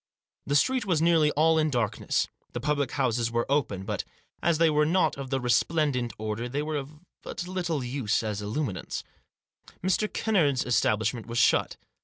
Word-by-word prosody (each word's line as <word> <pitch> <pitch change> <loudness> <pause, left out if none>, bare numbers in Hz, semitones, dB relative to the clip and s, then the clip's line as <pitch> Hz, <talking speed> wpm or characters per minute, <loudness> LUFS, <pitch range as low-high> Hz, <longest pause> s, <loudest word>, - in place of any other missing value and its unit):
The 145 - +1
street 250 - +2
was 170 -5 +2
nearly 165 -2 +4
all 160 +2 +4
in 155 0 +2
dark 120 -6 -1
ness. - - 0 0.3
The 120 - -3
public 145 0 -1
houses 120 -4 +1
were 120 0 0
open; 110 -10 0
but, 105 -2 -2 0.4
as 170 -1 +2
they 165 +1 +4
were 150 0 +3
not 175 +5 +2
of 135 -1 -6
the 135 0 0
resplendent 125 +1 +1
order, 110 +3 -3
they 145 +4 -2
were 155 0 -2
of 145 +2 -8 0.2
but 175 - -6
little 175 -6 -2
use 120 -4 -1
as 105 -1 -3
illuminants. 105 - -3 0.8
Mr. 190 +3 +1
Kennard's 155 - +1
establishment 110 -1 +1
was 120 0 -4
shut. 125 - +3
140 Hz, 175 wpm, -27 LUFS, 120-155 Hz, 0.8 s, nearly